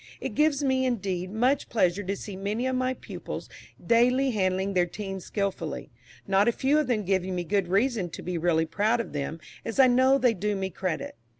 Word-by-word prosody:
It 260 - -4
gives 300 +2 +2
me, 260 -1 +2
indeed, 190 -6 -2
much 250 +7 +1
pleasure 195 -4 +2
to 195 0 -2
see 200 0 -7
many 205 +6 -2
of 260 0 0
my 255 0 0
pupils - - -7 0.4
daily 250 +3 +3
handling 190 -2 0
their 180 -1 +2
teams 195 0 -6
skilfully; 195 -8 -3 0.3
not 195 +2 +3
a - - +5
few 275 +5 +2
of 300 - 0
them 225 -4 0
giving 190 -1 0
me 175 - -1
good 195 +1 0
reason 200 0 +1
to - - -8
be 180 0 -3
really 165 -1 +2
proud 210 +8 +1
of 235 - -4
them, 145 +3 -3 0.2
as 230 - -5
I 265 - +9
know 260 +2 +5
they 250 -3 +3
do 210 +1 -1
me 190 -1 -3
credit. 185 -4 -3
205 Hz, 205 wpm, -27 LUFS, 185-250 Hz, 0.4 s, I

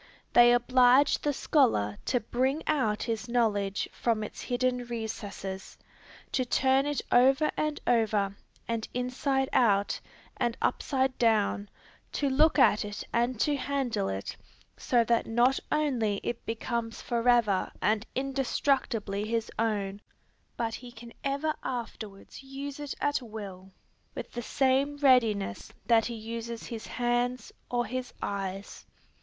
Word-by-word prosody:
They 240 0 +8
oblige 250 +3 +5
the 295 - +1
scholar 235 - +2
to 250 - +1
bring 260 +7 -1
out 225 -9 +1
his 230 +1 -3
knowledge 205 -5 +1
from 225 -3 0
its 215 - -7
hidden 250 0 0
recesses, 205 -4 -6 0.5
to 260 - +1
turn 265 +2 +2
it 290 -2 -1
over 270 +5 +5
and 305 -1 -1
over, 215 -4 +2 0.3
and 230 -1 -2
inside 265 +2 0
out, 205 -4 +3 0.4
and 240 -2 0
upside 265 -2 0
down, 210 -3 +2 0.4
to 280 -2 0
look 310 +4 +4
at 220 -6 +5
it 205 0 -6
and 240 0 +1
to 295 - +2
handle 270 - -1
it, 95 0 -4 0.4
so 240 -2 +2
that 235 0 +1
not 240 +4 +3
only 245 -10 +1
it 235 - -4
becomes 230 0 -3
forever 235 -5 +2
and 215 +2 +1
indestructibly 260 -6 0
his 225 0 -1
own, 205 -3 -1 0.6
but 230 -1 -1
he 245 +1 -8
can 235 0 -12
ever 280 +3 0
afterwards 220 -5 -6
use 275 +1 -7
it 290 -2 -5
at 290 -1 +1
will 200 -5 -8 0.4
with - - -6
the 240 - -4
same 270 +4 +1
readiness 230 - +2
that 230 -2 +4
he 235 - -5
uses 230 +1 -6
his 230 -3 -7
hands 245 +1 -1 0.2
or 240 0 0
his 255 +2 -4
eyes. 195 0 -5
240 Hz, 135 wpm, -29 LUFS, 215-265 Hz, 0.6 s, They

